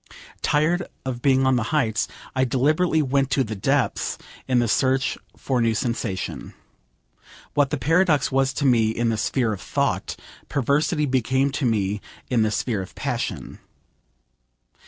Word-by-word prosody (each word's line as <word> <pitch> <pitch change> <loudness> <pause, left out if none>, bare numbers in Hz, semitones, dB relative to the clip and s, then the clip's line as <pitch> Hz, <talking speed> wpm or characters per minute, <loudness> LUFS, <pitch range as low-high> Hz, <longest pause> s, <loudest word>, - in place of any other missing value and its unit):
Tired 165 +5 +1 0.2
of 125 -2 -4
being 135 -1 +3
on 130 -1 +3
the 115 - -1
heights, 115 -9 +1 0.3
I 130 - +2
deliberately 155 +6 +2
went 135 0 +1
to 135 0 +2
the 110 -2 -5
depths 125 +3 0 0.3
in 130 -1 +2
the 120 -1 +3
search 130 +3 +1 0.2
for 130 -3 -1
new 115 -1 +2
sensation. 115 -5 -3 1.0
What 145 -2 +2
the 150 - -1
paradox 155 +2 +2
was 135 0 +2
to 140 - -2
me 115 -4 +4
in 115 +1 0
the 110 - 0
sphere 110 +1 0
of 100 - -7
thought, - - -1 0.3
perversity 150 +3 +1
became 130 +1 +1
to 135 -2 -1
me 105 -2 0 0.3
in 120 -3 +3
the 110 - +2
sphere 110 -1 -1
of 95 - -10
passion. - - -4
130 Hz, 155 wpm, -23 LUFS, 115-140 Hz, 1.0 s, me